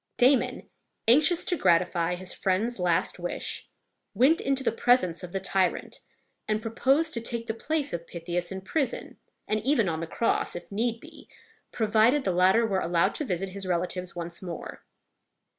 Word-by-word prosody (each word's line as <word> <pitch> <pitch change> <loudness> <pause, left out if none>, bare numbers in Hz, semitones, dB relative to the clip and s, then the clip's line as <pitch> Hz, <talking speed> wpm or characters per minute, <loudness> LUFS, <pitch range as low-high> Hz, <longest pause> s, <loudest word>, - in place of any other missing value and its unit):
Damon, 255 +1 +3 0.4
anxious 305 +8 +4
to 355 - +1
gratify 175 - +2
his 180 0 -6
friend's 200 +5 0
last 180 0 +1
wish, 175 0 -3 0.5
went 285 +7 +4
into 270 0 0
the - - +2
presence 230 -8 +2
of 180 -2 -7
the 195 - -2
tyrant, 190 -1 -1 0.5
and 215 0 +1
proposed 270 +8 +1
to 235 - -2
take 230 0 -3
the 225 - -2
place 290 +5 -2
of 170 0 -5
Pythias 175 +1 -4
in 190 0 -5
prison, 260 +6 -2 0.3
and 215 - 0
even 260 -6 +2
on 160 -2 -1
the 165 - -4
cross, 230 +7 0
if 175 - -8
need 230 +3 -1
be, - - -14 0.4
provided 225 +5 +3
the 190 - +1
latter 185 +6 +4
were 195 -4 0
allowed 170 -1 +1
to - - -3
visit 190 -3 -2
his 195 0 -7
relatives 180 0 -2
once 170 0 -5
more. 175 -4 -7
195 Hz, 170 wpm, -27 LUFS, 180-240 Hz, 0.5 s, anxious